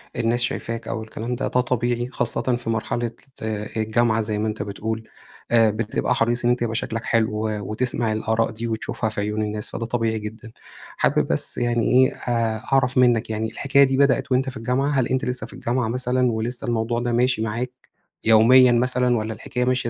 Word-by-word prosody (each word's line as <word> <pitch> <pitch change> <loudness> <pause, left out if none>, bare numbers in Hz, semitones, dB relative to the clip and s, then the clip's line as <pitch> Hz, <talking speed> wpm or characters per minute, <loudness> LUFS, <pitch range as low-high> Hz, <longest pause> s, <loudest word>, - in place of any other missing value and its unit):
الناس 120 +2 +1
شايفاك 115 -1 -3
أو 110 - -3
الكلام 115 +2 -5
ده، 125 - -2
ده 125 - +2
طبيعي، 120 0 -1
خاصةً 125 - 0
في 120 -1 -5
مرحلة 115 +1 -1 0.2
ز - - -8
آآ، 105 -1 -3
الجامعة 110 +1 +2
زي 105 -1 -2
ما 110 +1 -1
أنت 105 -1 -3
بتقول، 110 +2 -4 0.5
آآ، 115 -2 +5
بتبقى 110 +3 -1
حريص 120 +1 +1
إن - - +4
أنت 125 - 0
يبقى 115 -1 -1
شكلك 115 0 -3
حلو، 110 -2 +2
و 105 -1 -2
وتسمع 120 -1 0
الآراء 110 +1 0
دي 115 +2 -4
وتشوفها 110 0 -2
في 105 -1 -4
عيون 105 +1 -2
الناس، 105 0 -2
فده 115 - -4
طبيعي 115 -2 -1
جدًا. 110 +2 -8 0.5
حابب - - +2
بس - - -1
يعني 120 -1 +1
إيه، 130 +1 +5
آآ، 115 -2 -1 0.2
أعرف 130 -1 +2
منّك 120 -3 +3
يعني، 110 0 -2
الحكاية 140 +4 +3
دي 135 -1 +2
بدأت 140 -1 +2
وأنت 130 +1 +2
في 130 - -8
الجامعة؟ 125 +5 0
هل 120 - +1
أنت 130 0 -1
لسّه 125 -3 -2
في - - -13
الجامعة 120 -1 -1
مثلًا 125 +1 +1
ولسّه 115 +3 -3
الموضوع 120 0 0
ده 120 0 -1
ماشي 120 -1 +2
معاك 115 +3 -2 0.5
يوميًا 120 +3 +6
مثلًا، 125 0 +2
والّا 110 0 -3
الحكاية 125 +3 -3
ماشية 125 -2 0
115 Hz, 200 wpm, -23 LUFS, 110-125 Hz, 0.5 s, يوميًا